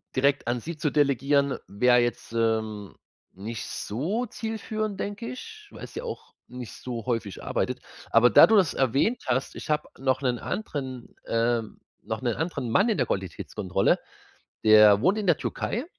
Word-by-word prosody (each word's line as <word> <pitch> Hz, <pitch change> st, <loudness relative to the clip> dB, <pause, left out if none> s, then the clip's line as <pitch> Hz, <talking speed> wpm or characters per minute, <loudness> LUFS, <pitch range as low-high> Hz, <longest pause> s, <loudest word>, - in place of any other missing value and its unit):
direkt 140 Hz, 0 st, +2 dB
an 120 Hz, +1 st, 0 dB
sie 165 Hz, +6 st, -7 dB
zu 150 Hz, -1 st, -1 dB
delegieren 140 Hz, 0 st, +2 dB
wär 125 Hz, +4 st, +4 dB
jetzt, 120 Hz, -1 st, -2 dB
ähm, 110 Hz, -3 st, -1 dB, 0.4 s
nicht 105 Hz, +4 st, -6 dB
so 170 Hz, -, -2 dB
zielführend, 215 Hz, -2 st, -4 dB
denke 205 Hz, +3 st, -4 dB
ich, 430 Hz, -, -10 dB
weil -, -, -9 dB
sie -, -, -7 dB
ja -, -, -6 dB
auch 465 Hz, -, -7 dB
nicht 125 Hz, -2 st, -8 dB
so 120 Hz, -3 st, -6 dB
häufig 115 Hz, -6 st, -3 dB
arbeitet. -, -, -2 dB, 0.3 s
Aber 120 Hz, +2 st, +6 dB
da -, -, +9 dB
du 220 Hz, -, +4 dB
das 185 Hz, -7 st, +4 dB
erwähnt 135 Hz, -, +1 dB
hast, 130 Hz, +1 st, -1 dB
ich -, -, -8 dB
hab 150 Hz, 0 st, 0 dB
noch 130 Hz, 0 st, +1 dB
'nen 125 Hz, -3 st, 0 dB
anderen 130 Hz, -, -5 dB
ähm, 115 Hz, -1 st, 0 dB, 0.2 s
noch 110 Hz, +3 st, -4 dB
'nen 120 Hz, -3 st, 0 dB
anderen 160 Hz, -7 st, -3 dB
Mann 200 Hz, -, +4 dB
in 220 Hz, -, +1 dB
der 125 Hz, -5 st, +1 dB
Qualitätskontrolle. 95 Hz, +1 st, -1 dB, 0.7 s
Der 105 Hz, -1 st, +8 dB
wohnt 185 Hz, -, +3 dB
in 210 Hz, -, -2 dB
der 175 Hz, -, +4 dB
Türkei 240 Hz, +7 st, -3 dB
130 Hz, 170 wpm, -26 LUFS, 115-180 Hz, 0.7 s, da